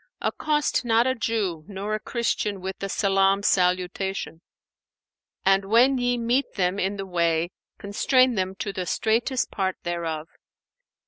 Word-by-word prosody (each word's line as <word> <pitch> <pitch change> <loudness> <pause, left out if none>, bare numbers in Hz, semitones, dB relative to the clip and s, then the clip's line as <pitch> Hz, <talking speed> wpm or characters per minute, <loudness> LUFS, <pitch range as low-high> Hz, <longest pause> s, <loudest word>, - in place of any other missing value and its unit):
'Accost 300 -3 0
not 230 0 +3
a 260 - +2
Jew 210 -9 -2
nor 205 +1 -4
a 215 - 0
Christian 215 -4 -2
with 190 +1 -6
the 195 - -4
salam 195 0 +2
salutation;[FN#492] 185 -1 0 1.0
and, 195 +1 +4
when 245 +6 +4
ye 245 0 +1
meet 240 +3 0
them 185 0 0
in 195 +1 0
the 195 - -4
way, 170 -2 0 0.3
constrain 255 +5 +2
them 190 -2 -2
to 200 +1 -4
the 185 -1 -4
straitest 235 +3 0
part 190 -2 -1
thereof.' 165 -2 -3
195 Hz, 140 wpm, -25 LUFS, 185-230 Hz, 1.0 s, and